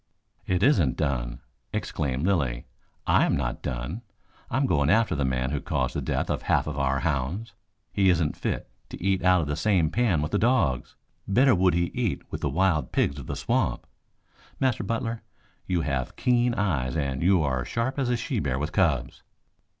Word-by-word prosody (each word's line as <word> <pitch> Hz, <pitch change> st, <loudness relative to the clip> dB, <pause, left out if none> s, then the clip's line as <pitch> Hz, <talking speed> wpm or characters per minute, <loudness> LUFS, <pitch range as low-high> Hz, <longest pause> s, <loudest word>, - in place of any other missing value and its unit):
"It 90 Hz, -1 st, +1 dB
isn't 90 Hz, -, +3 dB
done," -, -, -2 dB, 0.3 s
exclaimed 70 Hz, +1 st, -2 dB
Lilly. 70 Hz, -11 st, 0 dB, 0.4 s
"I -, -, +4 dB
am -, -, +2 dB
not 65 Hz, -3 st, -3 dB
done. 65 Hz, -, -4 dB, 0.5 s
I 120 Hz, -, -1 dB
am 135 Hz, -, +2 dB
going 70 Hz, -, +2 dB
after 110 Hz, +2 st, +3 dB
the 70 Hz, -, 0 dB
man 65 Hz, 0 st, -1 dB
who 70 Hz, -1 st, -2 dB
caused -, -, -1 dB
the -, -, -1 dB
death -, -, -1 dB
of -, -, -1 dB
half -, -, +1 dB
of 75 Hz, -, -4 dB
our 70 Hz, -1 st, 0 dB
hounds. 80 Hz, -, -2 dB, 0.4 s
He 95 Hz, -1 st, +3 dB
isn't 80 Hz, -4 st, +2 dB
fit -, -, -3 dB, 0.2 s
to -, -, -8 dB
eat 95 Hz, 0 st, 0 dB
out 90 Hz, -1 st, +5 dB
of 75 Hz, -, -3 dB
the 75 Hz, -, -1 dB
same 85 Hz, -3 st, +2 dB
pan 105 Hz, -11 st, +2 dB
with 75 Hz, -, -3 dB
the 105 Hz, -, +1 dB
dogs. 100 Hz, -, +1 dB, 0.3 s
Better 125 Hz, +6 st, +4 dB
would 90 Hz, -2 st, +3 dB
he 85 Hz, 0 st, 0 dB
eat 120 Hz, -6 st, -1 dB
with -, -, -4 dB
the 75 Hz, -, 0 dB
wild 80 Hz, -2 st, +1 dB
pigs 70 Hz, +1 st, 0 dB
of 65 Hz, -, -9 dB
the -, -, -3 dB
swamp. -, -, 0 dB, 0.7 s
Master 130 Hz, -5 st, +1 dB
Butler, 115 Hz, +2 st, -2 dB, 0.5 s
you 90 Hz, -2 st, +1 dB
have 65 Hz, -5 st, -2 dB
keen 120 Hz, -1 st, +2 dB
eyes 75 Hz, -10 st, 0 dB
and 70 Hz, -3 st, -1 dB
you 90 Hz, -1 st, +4 dB
are 65 Hz, -3 st, 0 dB
sharp 125 Hz, +5 st, -2 dB
as 130 Hz, -3 st, 0 dB
a 120 Hz, -, +1 dB
she 125 Hz, -1 st, -2 dB
bear 65 Hz, -6 st, -1 dB
with 75 Hz, +4 st, -2 dB
cubs." 75 Hz, -, 0 dB
85 Hz, 195 wpm, -26 LUFS, 70-105 Hz, 0.7 s, out